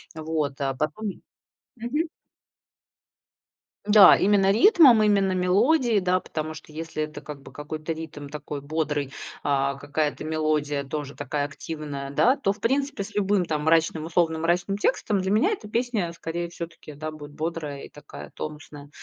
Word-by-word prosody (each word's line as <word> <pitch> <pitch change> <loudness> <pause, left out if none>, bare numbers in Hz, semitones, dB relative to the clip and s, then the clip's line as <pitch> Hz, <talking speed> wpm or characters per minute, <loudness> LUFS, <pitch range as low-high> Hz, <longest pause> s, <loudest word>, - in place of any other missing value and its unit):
Вот, 155 -3 -2
а 135 -1 0
потом 155 +9 -3 0.6
Мгм. 295 +8 -1 1.8
Да, 205 -3 +9
именно 195 -1 +4
ритмом, 270 - +7
именно 200 -2 +3
мелодией, 210 - +3
да, 185 0 +2
потому 155 -3 -5
что 155 -1 -12
если 160 -1 -4
это 150 -1 -7
как 150 -2 -9
бы - - -14
какой-то 155 +2 -5
ритм 160 -2 -8
такой 145 0 -6
бодрый, 145 -2 -2 0.3
а, 140 -1 +1
какая-то 145 +2 -2
мелодия 155 -2 0
тоже 140 0 -5
такая 145 0 -2
активная, 145 -2 -6
да, 250 - +4
то 195 - 0
в 205 - -7
принципе 270 -1 0
с 195 - -11
любым 200 -2 +2
там 150 -2 -2
мрачным, 160 0 +2
условно 160 -1 +1
мрачным 175 +4 0
текстом, 205 -1 +1
для 190 +1 -1
меня 295 - +3
эта 230 - -5
песня 225 -6 -1
скорее 170 +1 -4
всё-таки, 170 -3 -9
да, 155 +2 -5
будет 150 -1 -10
бодрая 155 -2 -4
и - - -10
такая 145 - -11
тонусная. 150 -1 -8
160 Hz, 155 wpm, -25 LUFS, 150-200 Hz, 1.8 s, Да